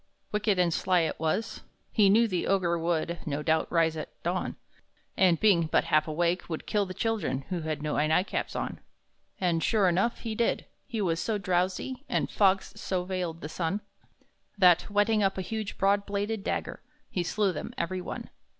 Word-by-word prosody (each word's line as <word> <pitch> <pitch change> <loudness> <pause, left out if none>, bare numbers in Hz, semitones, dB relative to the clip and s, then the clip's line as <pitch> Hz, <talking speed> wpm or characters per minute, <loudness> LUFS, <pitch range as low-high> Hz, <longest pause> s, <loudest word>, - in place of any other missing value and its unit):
Wicked 210 -1 +1
and 175 -2 +3
sly 180 0 +2
it 160 - -2
was; 160 +8 -1 0.3
he 205 -3 +5
knew 230 +4 +5
the 185 -5 -1
Ogre 175 -3 +2
Would, 170 0 -1
no 150 0 -2
doubt, 160 0 +1
rise 165 -2 +3
at 155 - -5
dawn, 180 +2 -1 0.6
And, 180 -3 +4
being 180 -7 +4
but - - +2
half 155 -1 +2
awake, 170 +4 0
would 160 - -4
kill 205 -2 0
the 185 - -7
children 220 - -1
Who 180 - -1
had 155 -2 -3
no 150 - -1
night 160 +4 +3
caps - - -3
on. - - -3 0.6
And, 170 -3 +1
sure 210 -4 +3
enough, 190 +7 +1
he 225 -2 -3
did! 230 +2 0 0.2
He 230 -5 -3
was 165 -4 0
so 220 +3 0
drowsy, 185 +7 -1
And - - 0
fogs 195 -1 +2
so 185 -2 -1
veiled 180 -3 -3
the - - -4
sun, 175 +5 -2 0.8
That, 180 -3 +5
whetting 205 +1 +2
up 195 -1 +1
a 190 - -2
huge, 220 0 -4
broad 200 +1 +2
bladed 205 +1 -2
dagger, - - -3 0.3
He 180 - 0
slew 195 +2 0
them, - - -5
every 185 +2 -2
one. - - -7
185 Hz, 185 wpm, -28 LUFS, 170-205 Hz, 0.8 s, he